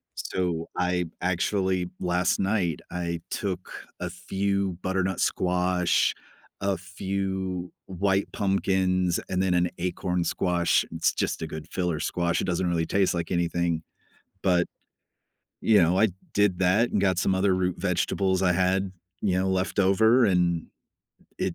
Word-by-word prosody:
So, 85 -3 -2
I 90 0 +1 0.2
actually 95 0 0
last 90 0 +1
night, 95 -5 0
I 85 -2 -3
took 95 -3 -3 0.3
a - - -3
few 100 -1 -1
butternut 95 0 -1
squash, 90 -1 +2 0.5
a 100 -1 0
few 95 -1 -3 0.2
white 95 +1 0
pumpkins, 95 -2 +1
and 90 0 0
then 95 -2 +2
an 90 0 +2
acorn 90 0 -1
squash 85 -1 +1
it's 80 0 +1
just - - -2
a 80 - -3
good 80 -1 -7
filler 90 -4 -1
squash, 85 +2 0
it - - -1
doesn't 90 0 0
really 85 -2 +1
taste 95 +2 +2
like 85 -1 -3
anything. 85 -2 0 0.6
But, 90 -2 +3 0.9
you 105 -4 +5
know, 85 +3 +3
I 110 - +5 0.3
did 100 -3 +3
that 95 +6 +3
and 105 - +1
got 95 -3 +2
some 95 0 +2
other 95 0 +2
root 90 -1 0
vegetables 95 -1 0
I 90 -1 +4
had, 95 +2 +1 0.3
you 95 -3 +2
know, 95 - 0
leftover 100 +5 +3
and 90 -4 +2 0.7
it 90 - -1
90 Hz, 140 wpm, -26 LUFS, 90-95 Hz, 0.9 s, you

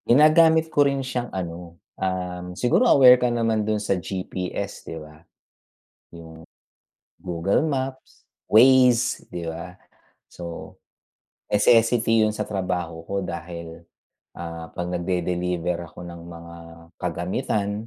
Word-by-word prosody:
Ginagamit 160 +4 +5
ko 145 - +4
rin 140 -1 0
siyang 125 -2 -3
ano, 85 -2 -6 0.2
um 90 -1 -3
siguro 120 - +3
aware 125 -2 +7
ka 125 - +2
naman 115 -2 0
doon 105 0 0
sa 105 - 0
GPS, 90 0 -5
di 80 - -6
ba? 75 0 -12 0.9
Yung 80 -1 -12 0.7
Google 90 - -1
Maps, 135 -3 -4 0.2
Waze, 125 +1 +5
di 85 -1 -5
ba? 85 +2 -6 0.6
So, 85 -1 -8 0.7
necessity 115 +1 +4
'yon 105 - -1
sa - - -2
trabaho 90 -4 -4
ko 100 - -5
dahil, 85 -1 -7 0.5
ah, 85 -1 -7
'pag 90 0 -4
nagde-deliver 90 -1 -1
ako 90 - -12
ng 85 -1 -9
mga 85 0 -11 0.4
kagamitan 100 +5 -2
90 Hz, 120 wpm, -24 LUFS, 85-120 Hz, 0.9 s, aware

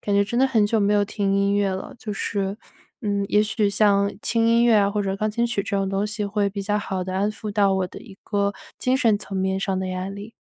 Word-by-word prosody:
感 205 - 0
觉 200 - +5
真 235 +4 -2
的 265 - +5
很 225 -5 +3
久 220 +1 +1
没 205 0 +2
有 205 0 +3
听 200 -1 -1
音 200 0 +2
乐 205 -1 +2
了， 190 0 -5
就 215 -3 -5
是 200 0 -2 0.4
嗯， 200 -2 -1
也 210 - +4
许 210 -1 0
像 200 -1 +3
轻 230 +1 +1
音 235 +1 +4
乐 235 - +5
啊 200 -1 +3
或 210 - -1
者 195 0 -2
钢 215 +2 -1
琴 235 +2 0
曲 235 -4 -1
这 200 - -4
种 195 -1 0
东 195 +2 0
西 210 -1 -3
会 200 0 0
比 200 +1 -5
较 205 +1 0
好 190 -2 -3
的 185 0 -5
安 200 +2 +1
抚 215 -1 -6
到 200 -1 +3
我 190 -1 0
的 - - -10
一 205 -6 -13
个 200 -1 0 0.3
精 255 - +1
神 225 -5 +3
层 200 - -8
面 190 0 0
上 195 -1 -1
的 190 - -2
压 185 +1 -4
力。 200 +3 -9
205 Hz, 290 characters per minute, -23 LUFS, 195-215 Hz, 0.4 s, 觉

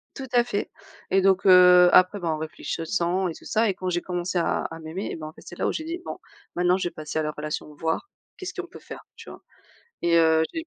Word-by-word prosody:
Tout 270 - -7
à 240 -1 +5
fait. 205 -4 -3 0.4
Et 195 - +3
donc, 195 +1 +3
heu, 180 -1 +8
après 185 +3 +5
ben, 170 -3 -3
en 155 - 0
réfléchissant 170 +3 -2
et - - -5
tout - - -15
ça 220 0 +1
et 195 - +1
quand 185 0 -4
j'ai 175 0 -1
commencé 180 0 -3
à 170 - 0
à 165 0 -6
m'aimer 160 +5 -5
et - - -4
ben 155 -1 -8
c'est 175 - -12
là - - 0
où - - +1
j'ai 315 - -5
dit: 340 +2 -4
«Bon, - - -6 0.4
maintenant 180 +1 +3
je 180 -2 -2
vais - - -25
passer 155 0 -4
à 155 - 0
la 150 - -2
relation, 150 0 -6
voir 165 - -2 0.3
qu'est-ce 370 - -6
qu'on 365 -2 -6
peut - - -13
faire?» - - -11
Tu - - -12
vois? - - -12 0.6
Et 170 -1 +3
heu, 160 -1 +4
j'ai 325 0 -5
180 Hz, 255 wpm, -25 LUFS, 160-195 Hz, 0.6 s, heu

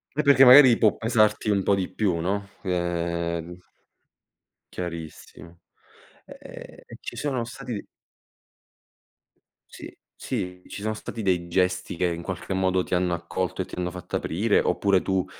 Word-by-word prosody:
E 150 - +1
perché 140 -1 +6
magari 130 -2 +9
può 110 -3 +3
pesarti 110 -2 +2
un 100 -2 +2
po' 100 - +2
di 95 -2 0
più, 95 -6 0
no. 100 +4 -2
Ehm 85 -1 -2 1.1
Chiarissimo. 85 0 -8 0.7
Ehm, - - -12 0.2
ci - - -8
sono 130 -5 -2
stati 120 -3 -7 1.8
Sì, - - -11 0.2
sì, 90 0 -5
ci 100 - -8
son 110 0 -2
stati 110 - -7
dei 90 -3 0
gesti 90 0 0
che, 90 +1 0
in 85 0 -3
qualche 95 +2 -5
modo, 95 -1 +1
ti - - -6
hanno 90 0 0
accolto 90 +2 -3
e - - -3
ti - - -10
hanno 90 -1 -2
fatto 90 -1 -7
aprire? 100 +6 +1
Oppure 100 -2 +2
tu 95 -1 0
95 Hz, 145 wpm, -25 LUFS, 85-105 Hz, 1.8 s, magari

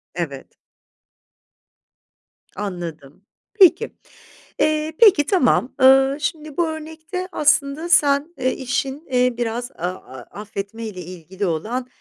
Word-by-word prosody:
Evet. 145 -6 -6 2.0
Anladım. 175 -5 -7 0.3
Peki, 390 +1 +5 0.7
eee, 310 0 +1
peki, 390 -10 +6
tamam. 270 -7 +2
Eee, 270 +1 +6
şimdi 305 -1 -4
bu 345 -2 +2
örnekte 320 +4 -6
aslında 295 +2 +1
sen, 295 -2 +3
eee, 255 - 0
işin, 270 +3 -3
eee, 250 -1 +2
biraz 240 +2 -3
a - - -30
a 130 -8 -8 0.2
affetmeyle 210 -1 -6
ilgili 180 +3 -6
olan 220 +10 -2
260 Hz, 105 wpm, -21 LUFS, 200-310 Hz, 2.0 s, peki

